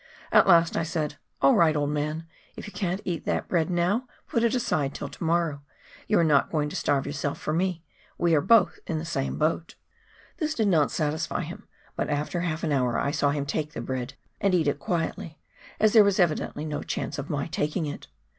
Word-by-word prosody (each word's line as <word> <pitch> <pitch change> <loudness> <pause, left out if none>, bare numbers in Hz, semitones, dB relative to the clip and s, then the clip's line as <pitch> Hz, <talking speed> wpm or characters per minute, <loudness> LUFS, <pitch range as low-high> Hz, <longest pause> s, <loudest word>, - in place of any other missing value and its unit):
At - - +6
last 170 -2 +5
I - - +1
said, 155 -3 -2
" - - -46
All 135 - +7
right, 160 -2 +4
old 145 -1 0
man; 150 +2 -2 0.3
if - - -8
you 205 - -9
can't 190 -1 -2
eat 175 -3 -2
that - - -1
bread 165 -2 +1
now 180 +8 +1 0.2
put 230 - 0
it 235 +1 +2
aside 150 - 0
till - - -5
to - - -8
morrow; 165 -3 +1 0.5
you 210 - +3
are - - +4
not 150 -4 +3
going 150 -2 0
to - - -7
starve 140 -2 +1
yourself 145 0 -3
for 155 - -2
me; 175 0 -1 0.3
we 170 -1 +2
are 150 - +4
both 195 -2 +4
in 160 - -1
the 155 - -4
same 135 -5 -2
boat." 160 +2 -1 0.6
This 310 -2 -1
did 220 -3 +2
not 155 -6 +3
satisfy 155 0 -1
him, - - -9 0.3
but - - -2
after 150 +4 -1
half 165 -2 -2
an 160 - 0
hour 125 -4 +1
I 140 - 0
saw 145 -1 +1
him 140 0 -1
take 150 +1 -3
the - - -5
bread 130 +1 -4 0.2
and 195 -2 +2
eat 160 -4 +2
it 145 0 0
quietly, 165 -2 -3 0.4
as 215 -1 +4
there 220 -3 +8
was 200 -1 +2
evidently 155 -3 0
no 150 -1 -3
chance 145 - -4
of 140 - -6
my 145 -1 -1
taking 155 +2 -1
it. 145 - -6
160 Hz, 220 wpm, -26 LUFS, 145-175 Hz, 0.6 s, there